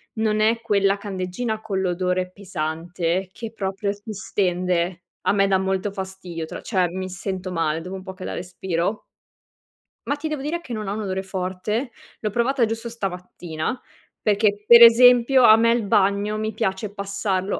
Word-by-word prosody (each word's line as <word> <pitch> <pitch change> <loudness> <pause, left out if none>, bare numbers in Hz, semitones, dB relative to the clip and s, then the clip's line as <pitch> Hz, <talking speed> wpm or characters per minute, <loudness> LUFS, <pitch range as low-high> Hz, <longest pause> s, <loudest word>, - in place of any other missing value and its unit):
non 215 -1 +1
è 230 +1 +2
quella 200 -3 +2
candeggina 200 +3 -3
con 195 -3 -2
l'odore 180 0 -1
pesante 175 0 -3
che 225 -2 -7
proprio 200 -1 -2
ti 205 +1 -9
stende. 180 -2 -1 0.2
A - - +4
me 195 -1 +3
dà 190 -1 +3
molto 190 +1 -1
fastidio 190 -4 -6
tra - - -8
cioè, 185 -5 +1
mi 185 +2 -5
sento 185 0 -5
male 165 -2 -1
dopo 185 +3 -7
un 190 - -8
po' 190 -1 -7
che 185 0 -10
la - - -4
respiro 180 +2 -3 1.0
ma 285 - +1
ti 305 +2 -5
devo 300 -3 -3
dire 325 +5 -3
che 255 - -11
non 215 -2 -4
ha 200 - -2
un 215 - -4
odore 190 -1 -2
forte. 190 +6 -3 0.3
L'ho 215 - -1
provata 240 +3 +1
giusto 225 +1 -4
stamattina 180 -1 -4 0.4
perché 205 0 +2
per 235 0 +9
esempio 245 +2 +7
a 215 - +9
me 230 +1 +4
il 235 -2 +1
bagno 200 +2 +2
mi 215 0 -2
piace 205 -1 -2
passarlo 200 -1 -2
195 Hz, 175 wpm, -23 LUFS, 185-220 Hz, 1.0 s, per